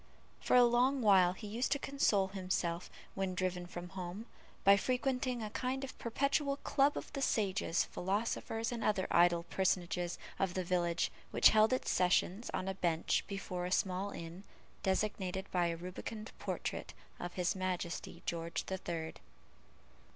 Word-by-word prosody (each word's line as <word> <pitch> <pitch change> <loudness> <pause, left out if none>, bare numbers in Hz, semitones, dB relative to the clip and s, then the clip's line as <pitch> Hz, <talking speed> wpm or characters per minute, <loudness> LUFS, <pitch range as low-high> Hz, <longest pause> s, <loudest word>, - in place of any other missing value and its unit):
For - - +2
a 250 - +9
long 245 +2 +3
while 185 -4 +6
he 210 - -9
used 230 +6 -1
to - - 0
console 220 -9 +1
himself, 185 -3 -2 0.2
when 190 -1 -2
driven 180 -1 -1
from 175 0 -7
home, 185 +3 -6 0.4
by 200 +1 +8
frequenting 250 +2 0
a 210 - -5
kind 260 +3 -2
of 270 - -6
perpetual 280 +4 0
club 280 +1 +3
of - - -6
the 275 - -3
sages, 200 -8 +1
philosophers, 225 +4 -2
and 235 -2 -3
other 205 -3 +2
idle 175 0 +5
personages 175 -1 0 0.2
of 190 -2 0
the 185 - 0
village, 175 -1 +1 0.2
which - - +7
held 215 +1 +5
its 255 - 0
sessions 185 +4 +2
on 185 - -2
a 190 - 0
bench 170 -4 +1
before 185 -3 -4
a - - -6
small 190 +1 +1
inn, 170 0 -8 0.4
designated 190 -1 -1
by 175 -1 +2
a 165 0 -2
rubicund 190 +5 -6
portrait - - -4 0.2
of 175 0 -5
his 180 +1 0
Majesty 185 -2 -3
George 170 0 -2
the 190 0 -3
Third. 165 -3 -5
190 Hz, 160 wpm, -34 LUFS, 180-225 Hz, 0.4 s, a